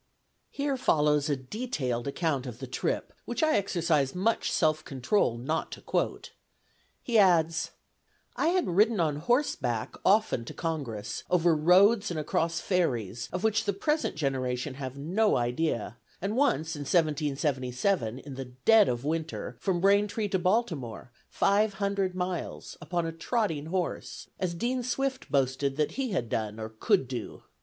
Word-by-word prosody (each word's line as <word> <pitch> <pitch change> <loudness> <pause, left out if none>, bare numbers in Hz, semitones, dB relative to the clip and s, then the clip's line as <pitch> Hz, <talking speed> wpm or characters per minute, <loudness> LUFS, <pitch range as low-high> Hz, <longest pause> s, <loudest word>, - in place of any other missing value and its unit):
Here 280 -1 -1
follows 150 - +2
a 145 - +2
detailed 130 - -3
account 140 -3 -1
of 120 -2 -7
the 130 - -6
trip, 130 - -2
which 240 - -2
I 310 0 +4
exercise 165 -8 +1
much 220 +5 +1
self 155 -1 +2
control 130 - 0
not 145 +7 -2
to - - -9
quote. - - -2 0.7
He 235 -3 +3
adds: 165 -4 +3 0.7
"I - - +1
had 360 +1 +2
ridden 210 +4 +3
on 155 -4 +1
horseback 150 - 0
often 200 - +3
to - - -8
Congress, 120 -11 -4
over 175 -2 +4
roads 195 +7 +5
and 170 -3 -3
across 165 +2 0
ferries, 120 - -1
of 180 +2 -3
which 220 0 +2
the 200 - +1
present 300 +11 0
generation 130 -2 -1
have 130 0 -6
no 190 +10 +2
idea; 120 -1 -1 0.2
and 200 +4 -2
once, 165 - +1
in - - -7
1777, 145 - 0
in 135 +1 -9
the 135 0 -5
dead 190 - +4
of 120 +2 -2
winter, 160 +1 -3
from 185 -3 0
Braintree 205 +2 +2
to 190 - +1
Baltimore, 170 - -1 0.2
five 205 +1 +2
hundred 200 -2 -1
miles, 180 -1 -4
upon 175 -2 -2
a 165 - -2
trotting 165 - -1
horse, 180 +1 -4
as 180 -2 -1
Dean 245 +7 -1
Swift 260 +2 -2
boasted 135 0 +1
that 150 -1 +1
he 265 -2 -2
had 175 - -1
done 110 -1 -3
or 110 0 -5
could 110 +3 +1
do. 125 -3 -6
165 Hz, 155 wpm, -28 LUFS, 135-200 Hz, 0.7 s, roads